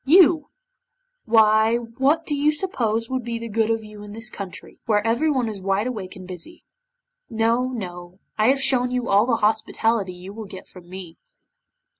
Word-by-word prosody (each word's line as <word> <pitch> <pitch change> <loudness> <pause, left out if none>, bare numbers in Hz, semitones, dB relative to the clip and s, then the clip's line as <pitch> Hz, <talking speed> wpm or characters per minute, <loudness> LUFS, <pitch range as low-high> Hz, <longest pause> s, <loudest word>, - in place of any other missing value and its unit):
You! 320 0 +5 0.8
Why 220 0 +5
what 265 +7 0
do 295 - -1
you 295 +2 +2
suppose 230 - -1
would 260 0 -2
be 235 0 -3
the 230 0 -6
good 225 0 +1
of 225 -1 0
you 210 -1 -11
in 205 0 -9
this 225 0 -7
country, 195 -2 -8
where 210 -1 +2
everybody 245 0 +1
is 200 -2 -8
wide 195 +2 0
awake 210 -7 -5
and 185 -1 -10
busy? 185 - -9 0.7
No, 230 +3 +1
no, 180 -7 -7 0.2
I 215 +1 +2
have 270 +1 +3
shown 255 -2 +2
you 250 -1 -2
all 205 +4 +4
the 240 - +3
hospitality 220 -2 +1
you 180 +2 -10
will 220 0 -7
get 190 -1 -10
from 175 -2 -15
me." 180 -3 -9
225 Hz, 180 wpm, -23 LUFS, 200-250 Hz, 0.8 s, You